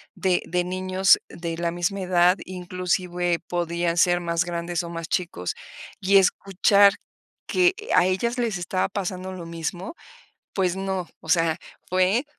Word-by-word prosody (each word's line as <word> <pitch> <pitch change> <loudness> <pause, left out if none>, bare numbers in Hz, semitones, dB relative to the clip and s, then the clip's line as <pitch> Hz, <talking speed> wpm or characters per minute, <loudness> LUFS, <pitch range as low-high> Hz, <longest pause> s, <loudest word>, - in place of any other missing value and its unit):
de 185 -2 +1
de 180 +1 0
niños 185 +1 +3
de 165 -1 -5
la 170 0 -1
misma 175 +3 -2
edad, 180 0 +3
inclusive, 180 -1 -2
podían 170 0 -1
ser 175 +1 +3
más 170 0 0
grandes 170 0 -2
o 170 - -6
más 165 -1 -6
chicos. 165 - -2 0.5
Y 195 +1 +4
escuchar 195 +1 +4 0.5
que 365 0 +3 0.2
a 180 - +5
ellas 235 +7 0
les 230 -5 0
estaba 175 +1 -1
pasando 190 -1 -4
lo 180 -2 -7
mismo, 170 - -5 0.6
pues 185 -2 0
no, 190 -2 -3
o 160 - -12
sea, 165 -1 +3 0.3
fue 185 +8 +2
180 Hz, 145 wpm, -24 LUFS, 170-190 Hz, 0.6 s, a